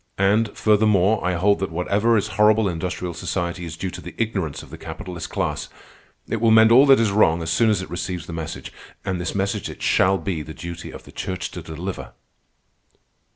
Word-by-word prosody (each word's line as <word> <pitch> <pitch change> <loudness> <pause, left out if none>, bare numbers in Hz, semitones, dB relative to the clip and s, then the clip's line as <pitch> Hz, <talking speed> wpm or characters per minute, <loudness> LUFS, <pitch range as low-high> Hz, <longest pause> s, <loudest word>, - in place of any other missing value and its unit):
And, 105 +3 +3
furthermore, 105 -1 +3
I 90 0 0
hold 100 +4 +2
that 95 - -2
whatever 100 +7 +1
is 105 +1 -1
horrible 110 +1 +4
in 90 - -1
industrial 90 +1 -4
society 85 +1 -3
is 80 -1 -7
due 95 +2 -3
to - - -8
the - - -10
ignorance 95 -10 -2
of - - -15
the - - -8
capitalist 90 -3 -7
class. - - -2 0.6
It 115 - -2
will 115 - +4
mend 110 0 +7
all 130 +4 +7
that 135 -2 +7
is 110 -3 +2
wrong 85 -5 +3
as 80 - -2
soon 110 +8 +3
as 100 -4 +1
it - - -10
receives 85 -1 -4
the 85 - -8
message. 80 -1 -6 0.3
And 95 -3 -2
this 85 - -3
message 100 +1 -1
it - - -9
shall 95 +1 +3
be 95 -5 -3
the 80 +1 -9
duty 85 0 -7
of - - -10
the - - -14
Church 95 0 -4
to 90 - -7
deliver." 85 +4 -6
95 Hz, 210 wpm, -22 LUFS, 85-105 Hz, 0.6 s, mend